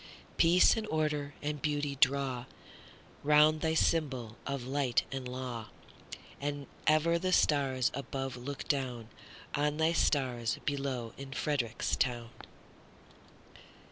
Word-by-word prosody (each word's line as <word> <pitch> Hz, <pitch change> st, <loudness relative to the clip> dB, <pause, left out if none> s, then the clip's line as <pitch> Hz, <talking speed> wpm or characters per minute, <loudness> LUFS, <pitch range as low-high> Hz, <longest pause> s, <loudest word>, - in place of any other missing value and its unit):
Peace 175 Hz, +2 st, +6 dB
and 220 Hz, -1 st, -3 dB
order 150 Hz, -3 st, -1 dB
and 150 Hz, -1 st, -3 dB
beauty 145 Hz, -2 st, -1 dB
drawRound 140 Hz, +3 st, +1 dB
thy 160 Hz, 0 st, +1 dB
symbol 135 Hz, -10 st, +1 dB
of 140 Hz, -2 st, -3 dB
light 130 Hz, -4 st, +1 dB
and 135 Hz, -2 st, -4 dB
law; 125 Hz, -3 st, -5 dB, 0.7 s
And 145 Hz, 0 st, -3 dB, 0.2 s
ever 160 Hz, +2 st, +4 dB
the 185 Hz, +1 st, -1 dB
stars 135 Hz, -7 st, +3 dB
above 135 Hz, -1 st, -4 dB
look 135 Hz, +3 st, -6 dB
downOn 125 Hz, -5 st, -2 dB, 0.7 s
thy 160 Hz, +1 st, +3 dB
stars 125 Hz, -7 st, +1 dB
below 135 Hz, -5 st, -2 dB
in 135 Hz, 0 st, -8 dB
Frederick 130 Hz, -5 st, -2 dB, 0.2 s
town! 120 Hz, -2 st, -1 dB
140 Hz, 110 wpm, -32 LUFS, 125-150 Hz, 0.7 s, Peace